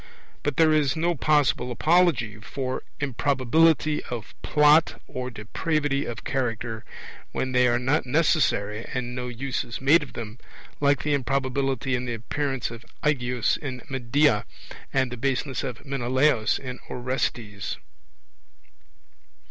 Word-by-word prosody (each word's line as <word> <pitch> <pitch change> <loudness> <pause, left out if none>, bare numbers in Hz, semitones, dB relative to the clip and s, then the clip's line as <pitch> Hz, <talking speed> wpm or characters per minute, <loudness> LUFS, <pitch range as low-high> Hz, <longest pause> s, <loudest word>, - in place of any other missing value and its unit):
But 145 -2 -2
there 160 -1 +5
is 150 -3 +2
no 170 +2 +1
possible 140 -5 +2
apology 150 -6 +2
for 130 +4 -4 0.2
improbability 145 +3 +2
of 115 -5 -6
Plot 150 +2 +4
or 130 0 -5
depravity 140 +5 -1
of 120 - -6
character, 120 -3 -2 0.5
when 130 - -1
they 125 0 +4
are 120 0 +3
not 130 +3 +1
necessary 125 -8 +2
and 125 -1 -2
no 125 0 -4
use 130 +2 -3
is 120 -2 -7
made 145 +6 +5
of 150 - -8
them, 115 0 -7 0.4
like 145 -1 +2
the 150 - +1
improbability 135 -1 0
in 125 0 0
the 120 -1 -2
appearance 135 +2 -2
of 115 0 -9 0.2
Aegeus 125 -5 +1
in 130 -4 -6
Medea 130 -2 +2 0.5
and 130 -2 +1
the 125 - -5
baseness 130 +1 -1
of 125 +2 -6
Menelaus 130 -2 +2
in 130 -1 -7
Orestes. 120 -5 -3
130 Hz, 130 wpm, -25 LUFS, 120-145 Hz, 0.5 s, there